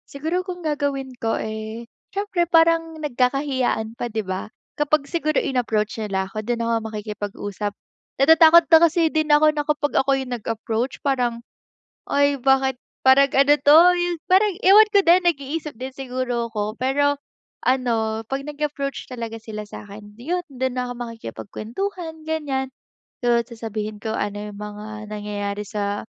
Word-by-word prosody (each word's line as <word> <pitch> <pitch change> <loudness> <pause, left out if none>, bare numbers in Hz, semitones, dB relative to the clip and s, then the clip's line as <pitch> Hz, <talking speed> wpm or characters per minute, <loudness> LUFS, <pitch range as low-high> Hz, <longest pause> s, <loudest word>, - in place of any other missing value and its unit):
Siguro 320 +6 -2
kung 355 -3 -7
gagawin 285 -3 -2
ko, 225 0 0
eh, 220 +1 -5 0.3
syempre 390 -3 0
parang 330 -1 +3
nagkakahiyaan 255 -4 0
pa, 240 - -3
di 220 -1 -2
ba? 185 +2 -4 0.3
Kapag 295 -1 +1
siguro 310 0 -1
inapproach 225 -4 0
nila 195 -3 -1
ako, 205 +3 -5
dun 235 +1 -2
ako 230 -1 -1
makikipag-usap. 205 -1 -5 0.5
Natatakot 325 +3 +7
na 325 - +9
kasi 335 -1 +4
din 310 -1 +1
ako 305 +1 +5
na 295 -1 -1
ako 290 -2 +1
yung 260 -2 -4
nag-approach, 225 +2 -3
parang, 245 -4 0 0.7
"Ay 285 0 +3
bakit, 265 0 +3 0.3
parang 270 +1 +6
ano 275 +2 +6
to?" 295 +2 +7 0.2
Yung 350 -1 -1
parang 390 +2 +4
ewan 415 +3 +8
ko 405 - +5
din, 350 +1 +5
nag-iisip 300 0 -2
din 260 +3 -6
siguro 250 -3 -2
ako. 210 0 -3
Pero 285 +3 +2 0.5
ano, 225 -4 +1
pag 270 +2 -3
nag-approach 290 -2 -4
talaga 230 -2 -5
sila 215 -1 -7
sa'kin 205 0 -11
yun, 350 +8 -2
dun 260 -2 -3
na 250 - -2
ako 245 - -5
makikipagkwentuhan, 240 - -6
ganyan. 290 -4 -2 0.6
So, 235 -1 +4
sasabihin 220 -2 -6
ko 220 +1 -3
ano 205 +1 -3
yung 200 - -11
mga 210 0 -8
nangyayari 205 -1 -4
sa, 205 0 -3
260 Hz, 145 wpm, -22 LUFS, 220-300 Hz, 0.7 s, na